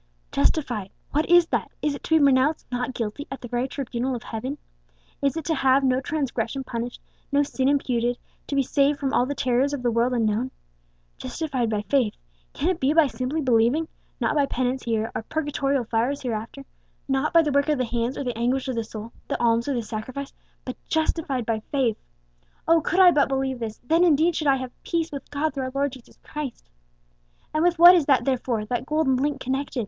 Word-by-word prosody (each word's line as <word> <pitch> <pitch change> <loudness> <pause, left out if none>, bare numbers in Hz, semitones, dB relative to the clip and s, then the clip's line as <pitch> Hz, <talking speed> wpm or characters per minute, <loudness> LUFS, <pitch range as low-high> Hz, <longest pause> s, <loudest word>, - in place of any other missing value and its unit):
"Justified, 215 - 0 0.2
what 305 +4 0
is 350 -1 +7
that? - - -1
Is 300 - +1
it 280 - -8
to 320 - +4
be 305 - +4
pronounced 280 +3 +3
'not 245 0 -2
guilty' 230 +5 -4
at 270 - -6
the 245 - -6
very 245 +2 -1
tribunal 260 -2 -3
of 235 - -7
Heaven? 255 +6 -5 0.6
Is 280 +2 +1
it 320 - -4
to 325 - +1
have 270 -1 +3
no 260 0 +2
transgression 270 -3 -2
punished, 240 -1 -5 0.3
no 285 +1 +3
sin 265 -1 0
imputed; 245 -4 +1 0.3
to 280 - -3
be 275 - +3
saved 280 +2 +2
from 275 -1 -1
all 250 - +3
the 285 - -3
terrors 260 +2 +1
of 270 -3 -4
the 240 - +2
world 235 +2 +1
unknown? 225 +1 0 0.7
Justified 270 -8 -2
by 210 -1 -1
faith. 245 -2 +1 0.4
Can 315 - 0
it 365 -3 -1
be 270 +3 +2
by 325 -1 +6
simply 270 +3 -2
believing? 250 +5 +2 0.3
Not - - +1
by 290 -2 +2
penance 255 0 -1
here, 225 -1 -1
or - - -3
purgatorial 280 -1 -1
fires 240 +6 -1
hereafter; 235 +3 -4 0.4
not 270 +2 0
by 335 -1 +6
the 300 - 0
work 280 +2 +2
of 300 - +2
the 255 - 0
hands 235 +2 -2
or - - -2
the 245 -3 -3
anguish 250 +4 0
of 260 - -1
the 230 -1 -1
soul, 220 +1 -8
the - - -2
alms 235 +1 +2
or 280 - 0
the 235 - -1
sacrifice, 250 +6 -6 0.3
but 255 - -5
justified 310 -6 0
by 225 -1 0
faith. 255 -6 +1 0.7
Oh! 330 0 +5
could 350 +4 0
I 365 -2 +8
but 290 -4 +3
believe 265 -1 -1
this, 220 -2 -5
then 325 +7 +3
indeed 330 0 +4
should 310 -3 -1
I 275 - +5
have 260 -1 -5
peace 335 -1 -2
with 280 -2 -7
God 290 +1 -1
through 270 -2 -3
our 260 - -4
Lord 280 0 +1
Jesus 255 -2 -14
Christ! 295 - -6 0.9
"And 310 +1 +1
with 350 -1 +3
what 345 +2 +10
is 335 -6 +3
that 275 -3 +3
therefore, 245 -5 -1
that 245 +4 -3
golden 300 -4 +2
link, 280 +1 -1
connected?" 265 +1 -2
265 Hz, 215 wpm, -24 LUFS, 240-290 Hz, 0.9 s, what